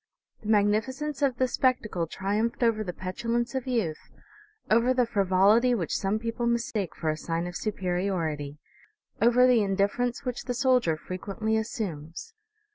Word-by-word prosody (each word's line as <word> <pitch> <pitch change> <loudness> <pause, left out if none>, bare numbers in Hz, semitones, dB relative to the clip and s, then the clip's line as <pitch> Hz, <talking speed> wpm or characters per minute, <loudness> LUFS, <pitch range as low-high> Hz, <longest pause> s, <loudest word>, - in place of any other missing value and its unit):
The 210 - -9
magnificence 220 +8 +1
of 265 -4 +1
the 255 - +2
spectacle 230 -10 0
triumphed 210 +8 -1
over 225 -2 +2
the 180 - -4
petulance 235 +7 -2
of 265 -1 -3
youth, 215 -12 -2 0.6
over 235 +4 +3
the 250 -1 +3
frivolity 205 +4 +3
which 175 -8 -2
some 195 +2 0
people 230 +1 -2
mistake 235 -5 -1
for 160 -2 -1
a - - -2
sign 165 +2 -3
of 180 0 -6
superiority, 175 -7 -2 0.6
over 240 +2 +5
the 250 -3 +5
indifference 205 +6 0
which 250 -1 -4
the 245 - -2
soldier 250 - +2
frequently 195 +6 -3
assumes. 205 - -4
220 Hz, 145 wpm, -27 LUFS, 185-240 Hz, 0.6 s, over